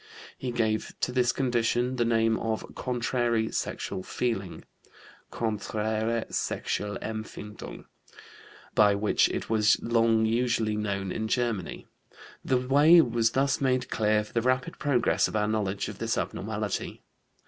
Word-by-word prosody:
He 130 Hz, -, -5 dB
gave 110 Hz, -2 st, -1 dB
to -, -, 0 dB
this 125 Hz, -1 st, +2 dB
condition 125 Hz, 0 st, 0 dB
the 120 Hz, -, +2 dB
name 115 Hz, -1 st, +2 dB
of 110 Hz, -1 st, -3 dB
"contrary 120 Hz, -2 st, -1 dB
sexual 95 Hz, -, -3 dB
feeling" 100 Hz, -4 st, -3 dB, 0.7 s
(Konträre 110 Hz, +1 st, -1 dB
Sexualempfindung), 105 Hz, 0 st, -4 dB, 0.9 s
by 105 Hz, -1 st, +5 dB
which 105 Hz, +1 st, +2 dB
it -, -, -4 dB
was 110 Hz, -1 st, +3 dB
long 115 Hz, -1 st, +3 dB
usually 115 Hz, -1 st, +1 dB
known 100 Hz, -3 st, -2 dB
in 110 Hz, +2 st, -2 dB
Germany. 115 Hz, -6 st, -2 dB, 0.6 s
The 130 Hz, -, +2 dB
way 145 Hz, +7 st, +6 dB
was 115 Hz, -4 st, +1 dB
thus 135 Hz, +1 st, +1 dB
made 130 Hz, -2 st, 0 dB
clear 105 Hz, -1 st, +2 dB
for 105 Hz, -, -15 dB
the 115 Hz, -, +1 dB
rapid 130 Hz, +1 st, 0 dB
progress 140 Hz, -5 st, +2 dB
of -, -, -7 dB
our 105 Hz, 0 st, +1 dB
knowledge 105 Hz, -3 st, -1 dB
of -, -, -8 dB
this -, -, -1 dB
abnormality. -, -, -3 dB
115 Hz, 130 wpm, -27 LUFS, 110-125 Hz, 0.9 s, way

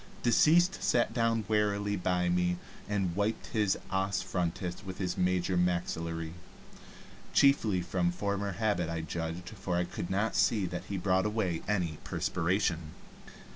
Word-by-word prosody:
Deceased 170 Hz, +9 st, +4 dB
sat 120 Hz, -1 st, +2 dB
wearily 105 Hz, -3 st, +1 dB
down 95 Hz, -, -5 dB
by 90 Hz, 0 st, +1 dB
me, 90 Hz, 0 st, +1 dB, 0.3 s
and 95 Hz, -4 st, 0 dB
wiped 105 Hz, +3 st, -1 dB
his 105 Hz, -3 st, +2 dB
os 95 Hz, -1 st, 0 dB
frontis 90 Hz, +1 st, -3 dB
with 95 Hz, -1 st, -7 dB
his 90 Hz, -2 st, -2 dB
major 90 Hz, 0 st, +1 dB
maxillary 85 Hz, -2 st, -1 dB, 1.0 s
chiefly 110 Hz, -9 st, +4 dB
from 85 Hz, 0 st, 0 dB
former 100 Hz, +1 st, -2 dB
habit 100 Hz, -4 st, 0 dB
I 80 Hz, -1 st, -2 dB
judged, 80 Hz, +2 st, -4 dB
for 95 Hz, -4 st, -3 dB
I 90 Hz, -, +2 dB
could 85 Hz, 0 st, -5 dB
not 100 Hz, +4 st, 0 dB
see 105 Hz, -4 st, +3 dB
that 90 Hz, 0 st, -5 dB
he 100 Hz, -, -3 dB
brought 95 Hz, +2 st, +2 dB
away 100 Hz, -6 st, -1 dB
any 90 Hz, -7 st, -1 dB
perspiration. 85 Hz, -2 st, -1 dB
95 Hz, 140 wpm, -31 LUFS, 90-105 Hz, 1.0 s, Deceased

